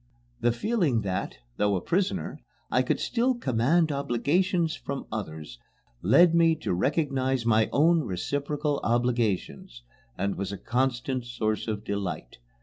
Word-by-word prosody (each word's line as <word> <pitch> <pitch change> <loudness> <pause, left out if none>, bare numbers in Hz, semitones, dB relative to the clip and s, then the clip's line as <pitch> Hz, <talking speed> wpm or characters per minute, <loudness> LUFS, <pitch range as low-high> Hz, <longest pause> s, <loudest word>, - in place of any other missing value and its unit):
The 120 0 +2
feeling 145 - +1
that, 95 -6 -3 0.2
though 100 -1 +2
a - - 0
prisoner, 190 - -1 0.3
I - - +3
could - - 0
still 250 +1 +1
command 150 - +2
obligations 155 - +1
from 140 0 -5
others 80 - -6 0.4
led 150 - +5
me 165 -1 +4
to 155 - -3
recognize 135 - 0
my 110 -1 +3
own 165 +4 +4
reciprocal 145 - -2
obligations, 115 - -1 0.3
and 100 0 -1
was 100 0 -3
a 100 - -5
constant 130 +1 -1
source 110 -3 -2
of 105 -1 -3
delight. 95 - -4
125 Hz, 135 wpm, -27 LUFS, 105-155 Hz, 0.4 s, led